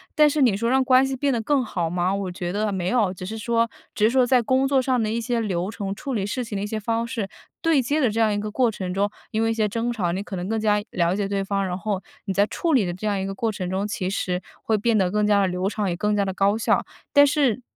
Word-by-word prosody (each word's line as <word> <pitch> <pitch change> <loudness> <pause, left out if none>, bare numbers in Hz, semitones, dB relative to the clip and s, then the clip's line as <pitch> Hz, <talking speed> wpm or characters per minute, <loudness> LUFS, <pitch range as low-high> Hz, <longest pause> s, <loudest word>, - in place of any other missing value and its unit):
但 300 -1 +6
是 295 0 0
你 230 -7 +4
说 230 +2 -1
让 265 +1 +3
关 260 +1 +5
系 270 - -2
变 280 +2 0
得 240 - 0
更 265 +4 +1
好 175 -7 -2
吗？ 180 +2 0
我 195 -2 -2
觉 175 -1 -4
得 210 +2 -1
没 180 -2 -2
有。 215 -7 +2
只 185 - -9
是 220 +4 -5
说 230 +1 +1 0.2
只 210 - +2
是 - - +5
说 255 0 +3
在 250 0 +4
工 260 +4 +2
作 270 -1 +3
上 255 -2 +1
的 215 - -1
一 230 +1 -1
些 240 0 -1
流 190 -4 -1
程， 200 -2 -4
处 265 +6 -5
理 200 -3 -1
事 245 +5 -2
情 220 -4 -5
的 195 - -2
一 - - -2
些 215 +1 -3
方 230 +2 -1
式， 225 -4 -4 0.3
对 325 -3 +3
接 285 +5 0
的 255 -6 +3
这 225 +2 -2
样 215 -2 +3
一 205 - -1
个 210 +1 -3
过 240 +1 +2
程 185 -3 -5
中， 200 +2 +1 0.2
因 220 +1 0
为 225 - +2
一 - - +1
些 215 -2 0
争 230 +3 -1
吵， 185 -7 -1
你 190 +3 -3
可 195 - -7
能 180 +3 -4
更 225 0 0
加 210 -1 +2
了 170 -1 +1
解 200 -1 -1
对 195 0 -1
方， 195 0 -1
然 180 0 -3
后 200 -1 -2 0.2
你 195 - -2
在 200 +2 +3
处 330 +7 -1
理 245 -6 +4
的 175 - -2
这 185 +5 -7
样 205 -2 0
一 - - -2
个 195 - -5
过 225 +2 -1
程 185 -3 -4
中， 195 +2 -1
其 190 -3 -2
实 180 -2 -2 0.2
会 220 - +1
变 225 +1 +2
得 185 -2 +2
更 210 0 +1
加 205 -1 +4
地 195 - +2
流 180 +2 -1
畅， 210 -2 -2
也 175 - -1
更 210 +3 0
加 200 -1 +1
地 190 - -2
高 200 +3 +2
效。 225 - +2 0.3
但 285 -1 +7
是 275 -5 +1
210 Hz, 330 characters per minute, -23 LUFS, 195-235 Hz, 0.3 s, 但